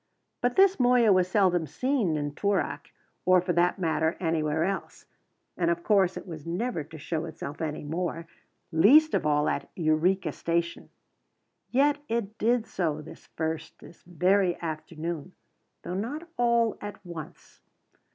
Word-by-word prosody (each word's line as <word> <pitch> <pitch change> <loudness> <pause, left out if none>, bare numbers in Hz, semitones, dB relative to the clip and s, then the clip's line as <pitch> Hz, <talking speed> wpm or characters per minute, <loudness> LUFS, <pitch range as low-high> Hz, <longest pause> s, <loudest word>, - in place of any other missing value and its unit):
But 245 0 +1
this 390 -2 +5
Moya 245 -4 +5
was 185 -1 +3
seldom 185 -4 +2
seen 215 - 0
in 145 -1 -3
Toorak, 200 +4 -1 0.3
or, 185 0 +5
for 180 0 -1
that 175 +3 +2
matter, 160 -2 0
anywhere 160 -2 0
else; 195 +2 -4 0.5
and, 170 -2 +1
of 170 0 -1
course, 195 -4 +3
it - - -7
was 160 -5 -8
never 175 0 -2
to 160 +2 -12
show 160 +2 -3
itself 155 -2 -7
any 155 -1 -3
more, 165 +2 -3 0.5
least 275 - +6
of 150 - +1
all 150 0 +2
at - - -2
Eureka 165 +2 +1
Station. 170 +2 -2 0.8
Yet 285 +3 +3
it 225 -2 -2
did 235 +1 +2
so 160 -8 -2
this - - -13
first, 160 0 -3
this 170 - -15
very 180 +1 +1
afternoon, 160 +1 -5 0.5
though - - -5
not 265 - -4
all 235 -2 +2
at 205 -1 -8
once. 170 -4 -10
175 Hz, 150 wpm, -27 LUFS, 160-210 Hz, 0.8 s, least